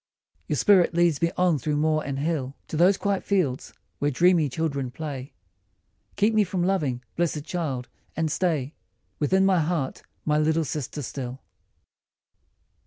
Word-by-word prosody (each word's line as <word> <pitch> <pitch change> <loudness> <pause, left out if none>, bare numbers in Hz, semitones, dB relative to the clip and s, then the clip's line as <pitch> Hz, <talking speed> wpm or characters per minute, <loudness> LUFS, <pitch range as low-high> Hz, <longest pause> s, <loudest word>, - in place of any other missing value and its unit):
D. 80 +2 -47
Your 150 - -1
spirit 185 -2 +4
leads 170 -4 +3
me 170 - +3
on 180 -5 +3
through 150 +4 -1
moor 155 +1 +2
and 140 -1 -3
hill 140 -3 -2
To - - -4
these 180 +5 +5
quiet 200 -2 -1
fields 170 -11 0 0.3
where 145 - +1
dreamy 165 +2 +3
children 140 -2 -2
play; 140 -1 -6 0.8
Keep 210 +2 +2
me 215 -1 +4
from 180 -2 -2
loving, 150 -10 0
blessed 165 -3 -1
child, 145 -8 -3 0.3
and 160 -1 0
stay 155 -6 0 0.5
Within 190 +6 +3
my 190 -2 +4
heart, 155 -4 -1 0.2
my 150 0 +2
little 160 +1 +2
sister 145 0 -4
still 130 0 -5
155 Hz, 155 wpm, -25 LUFS, 140-175 Hz, 0.8 s, these